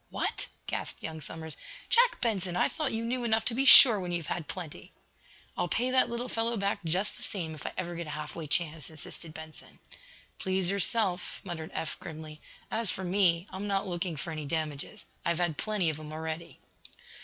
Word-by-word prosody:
"What?" - - -2 0.2
gasped - - -3
young 160 -1 -5
Somers. 160 +1 -6 0.3
"Jack 485 +1 +5
Benson, 195 -7 0
I - - +3
thought 305 -4 -2
you 225 +1 -2
knew 245 +1 -1
enough 220 -1 +2
to 240 - 0
be 265 +4 +1
sure 235 -5 +11
when 180 -2 -4
you've 170 -2 -2
had 160 -4 -6
plenty!" 175 -5 -7 0.6
"I'll - - 0
pay 245 +9 +1
that 255 -1 +5
little 235 +1 -3
fellow 230 0 0
back, 200 -1 -1
just 180 +5 0
the - - -12
same, 165 -6 -4
if 150 - -8
I - - -5
ever 175 -1 -3
get 170 -1 -5
a 150 - -5
half 150 -1 -6
way 165 -2 -5
chance," 160 -1 0
insisted 160 +1 -7
Benson. 160 0 -11 0.6
"Please 190 -1 0
yourself," 200 -1 +2
muttered 165 -4 -6
Eph, 165 - -3
grimly. 155 -1 -9 0.3
"As 225 -3 +3
for 190 - -2
me, 180 -2 +2
I'm 190 +2 -5
not 195 0 0
looking 175 -2 -3
for 155 +3 -5
any 155 -2 -5
damages. 150 -2 -4 0.2
I've 170 -1 +1
had 175 -4 -1
plenty 205 -7 +1
of 155 - -8
'em 155 0 -9
already." 160 +1 -5
175 Hz, 200 wpm, -29 LUFS, 160-210 Hz, 0.6 s, sure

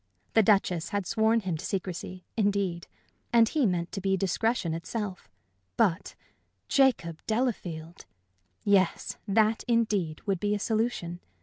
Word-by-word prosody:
The 225 - +6
Duchess 190 -5 +2
had 200 -2 -2
sworn 225 +3 +2
him 180 -5 -2
to - - -8
secrecy, 185 -1 -4
indeed; 200 -5 0 0.4
and 230 -1 +6
he 285 -1 +2
meant 175 -2 -1
to 195 - -4
be 195 0 +1
discretion 195 -1 0
itself. 185 - -5 0.5
But 180 -1 +1 0.5
Jacob 240 - +2
Delafield! 180 -9 -2 0.6
Yes, 195 -3 +2
that, 215 +2 +2
indeed, 210 -9 +1
would 195 -4 0
be 205 +2 +1
a - - -3
solution. 215 -6 -1
200 Hz, 130 wpm, -28 LUFS, 175-225 Hz, 0.6 s, The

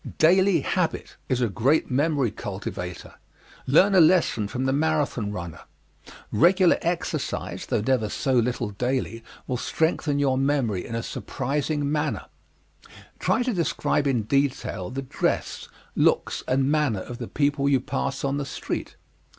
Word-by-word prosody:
Daily 185 +1 +4
habit 180 +3 -2
is 130 -2 +1
a 120 - +3
great 130 +9 +1
memory 140 -3 +1
cultivator. 95 -4 -6 0.5
Learn 185 +9 +5
a 185 - +7
lesson 155 - +3
from 130 +5 -3
the 135 - +1
Marathon 145 -8 0
runner. 85 -5 -6 0.7
Regular 180 - +4
exercise, 170 +1 -3
though - - 0
never 110 -2 +1
so 135 +5 -1
little 120 -2 +1
daily, 125 +1 -2 0.2
will 125 - -2
strengthen 160 +1 0
your 135 -2 +2
memory 135 -9 0
in 115 - -5
a 115 - -2
surprising 145 +3 -2
measure. 150 0 -1 0.9
Try 245 - +1
to 250 -1 -1
describe 165 -4 0
in 125 -5 +1
detail 130 -7 -1
the 135 +2 -4
dress, 130 - -2 0.3
looks - - +2
and 135 +2 +2
manner 145 -10 +1
of 120 +4 -8
the - - -5
people 140 -1 +1
you 135 -2 +4
pass 135 +1 -3
on 140 0 0
the 145 - -2
street. - - -5
135 Hz, 145 wpm, -25 LUFS, 120-150 Hz, 0.9 s, a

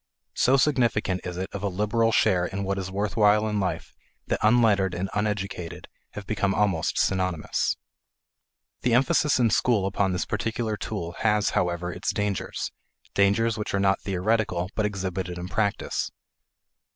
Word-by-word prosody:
So 130 +2 +3
significant 120 -9 +1
is 90 0 -5
it 95 +1 -4
of 100 - -4
a 100 - 0
liberal 105 +4 +1
share 95 -5 +3
in 100 +1 -4
what 100 0 -1
is 95 -1 -4
worth 100 +3 -2
while 105 0 +4
in 105 -1 -1
life 90 -4 -3 0.3
that - - -1
unlettered 105 -5 +3
and 95 +2 -3
uneducated 100 -5 -3 0.3
have 105 - -7
become 100 -1 0
almost 95 -6 +1
synonymous. 90 -4 0 1.0
The 120 -1 +2
emphasis 150 +3 +3
in 115 -3 +3
school 105 -3 +2
upon 95 0 0
this 90 - -1
particular 110 0 -2
tool 100 -5 -4
has, 105 -2 +2
however, 90 0 -1
its 90 - -2
dangers 105 -2 -2 0.4
dangers 110 +3 +2
which 105 - -2
are - - +1
not 95 0 +2
theoretical 95 -2 0
but 105 -1 +1
exhibited 95 -3 -4
in 90 0 -5
practice. 100 +2 -1
100 Hz, 155 wpm, -26 LUFS, 95-110 Hz, 1.0 s, while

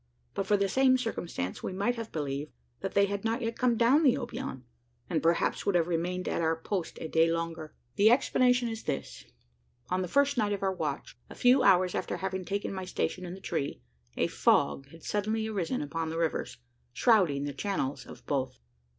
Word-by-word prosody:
But 195 - -2
for 205 - +4
the 200 0 +1
same 260 +5 +4
circumstance, 175 - -4
we - - -4
might 200 +6 +1
have 230 -2 -6
believed, 145 -1 -3 0.3
that - - -5
they 200 0 +5
had 200 0 -3
not 230 +3 -1
yet 230 0 -2
come 245 -2 +3
down 245 +7 +5
the 270 -6 +5
Obion; 130 -1 -5 0.5
and 165 - +1
perhaps 170 +1 +1
would 200 - +1
have 170 -1 +3
remained 180 +2 -1
at - - -1
our 165 0 +2
post 175 +2 -4
a - - -4
day 165 +1 +3
longer. 165 -2 -4 0.2
The 210 +2 +6
explanation 250 0 +3
is 225 -1 -5
this: - - -4 0.7
On 185 +1 +1
the 180 - -2
first 280 +3 +2
night 205 -1 +1
of 200 - -4
our 190 -1 +1
watch, 145 -8 -4
a - - -10
few 250 +2 +5
hours 185 -5 +4
after - - -2
having 190 -1 -3
taken 200 +1 -2
my 190 -1 -4
station 185 0 -2
in 175 - -6
the - - -11
tree, 140 - -3 0.3
a - - +2
fog 135 - +2
had 165 +2 -15
suddenly 215 +2 -1
arisen 210 -1 -2
upon 160 +2 -3
the 165 - -4
rivers, 165 -1 -1 0.4
shrouding 180 - +3
the 145 0 -3
channels 145 -4 -3
of - - -12
both. 135 - -2
190 Hz, 200 wpm, -29 LUFS, 165-225 Hz, 0.7 s, The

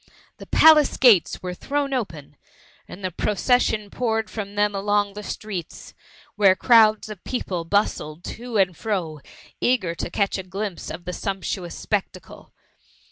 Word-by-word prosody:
The - - -12
palace 310 -2 +6
gates 230 -10 +4
were 180 0 -4
thrown 280 +7 -2
open, 165 - -4 0.5
and 195 - -11
the 185 - -2
procession 210 +2 0
poured 225 -3 -1
from 205 -2 -6
them 205 0 +1
along 205 0 0
the 210 - -7
streets, 195 -5 -7 0.4
where 200 -3 +5
crowds 220 -1 +4
of 210 -4 -10
people 185 -9 -3
bustled 165 -4 -1
to 240 -1 -5
and 185 -3 +2
fro, 180 -8 -3 0.4
eager 225 -9 +1
to 170 - -5
catch 200 -1 -1
a - - -5
glimpse 195 0 -5
of 175 +2 -8
the 180 - -4
sumptuous 190 -2 -4
spectacle. 190 -3 -5
205 Hz, 145 wpm, -23 LUFS, 180-220 Hz, 0.5 s, palace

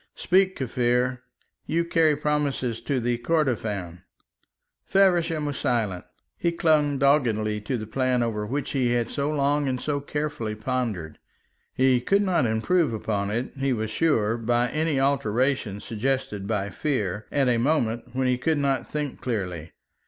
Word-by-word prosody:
"Speak, 190 +1 +2
Kaffir. 125 0 0 0.5
You 170 +2 +1
carry 160 -2 +3
promises 145 -5 -1
to 140 -3 -1 0.2
Kordofan." 110 - -1 0.8
Feversham 175 -5 +2
was 145 -2 -3
silent. 110 -9 -1 0.3
He 170 - +1
clung 155 -4 +2
doggedly 115 -7 +2
to 120 +4 -2
the 110 - -5
plan 125 +2 +1
over 110 -2 -2
which 140 +5 -3
he 125 -3 +1
had 120 -1 0
so 140 +1 -1
long 145 -1 +1
and 130 -1 -1
so 145 +1 -1
carefully 145 -7 -3
pondered. 110 -9 -3 0.6
He 130 -1 +3
could 200 +10 +2
not 180 -10 +2
improve 120 +6 +1
upon 105 -2 -2
it, 120 +5 -2
he 135 -1 +1
was 110 -2 -3
sure, 115 -6 +1
by 120 +1 +1
any 155 -1 0
alteration 130 -5 +1
suggested 110 -2 -2
by 100 -2 -1
fear, 105 - -2
at 140 -2 +2
a 120 -2 +2
moment 120 -4 +1
when 130 0 +1
he 125 -1 +1
could 160 +3 +1
not 140 -3 0
think 150 -2 -4
clearly. 90 -9 -3
130 Hz, 150 wpm, -25 LUFS, 110-145 Hz, 0.8 s, carry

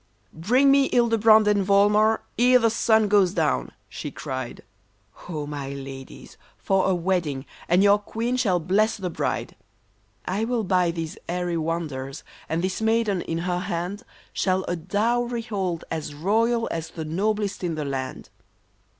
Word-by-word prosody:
" - - -39
Bring 250 +12 +3
me 275 -1 +4
Hildebrand 225 -3 +5
and 205 -1 +3
Volmar, 210 +3 +3 0.2
ere 250 +1 +6
the 230 -2 +2
sun 220 -1 +3
goes 200 -3 +3
down! 65 -1 0
" - - -41
she - - -6
cried, 130 -2 -6 0.3
" 100 0 -41 0.2
Ho! 155 -4 -3
my 140 -2 -5
ladies, 135 -1 -9 0.2
for 195 -1 +1
a 190 - +2
wedding, 170 -6 -1 0.2
and 180 +3 +4
your 205 0 +5
queen 230 +4 -3
shall 205 -8 +2
bless 200 +7 +1
the 185 -3 -4
bride! - - -3 0.4
" 105 - -40 0.2
I 195 +4 -1
will 235 -1 0
buy 180 -2 +2
these 165 -1 -5
airy 175 0 -1
wonders, 155 -4 -3 0.3
and 165 +2 -1
this 185 +3 -2
maiden 220 -4 +1
in 165 - -3
her 180 0 0
hand 180 +4 -3 0.3
Shall 185 0 +1
a 175 - -1
dowry 230 +7 -1
hold 190 -7 -3
as 155 -2 -4
royal 225 +8 +1
as 165 -1 -4
the 160 -2 -6
noblest 200 +5 -1
in 170 -2 -1
the 150 -1 -3
land." 130 -2 -5
185 Hz, 165 wpm, -24 LUFS, 160-220 Hz, 0.4 s, ere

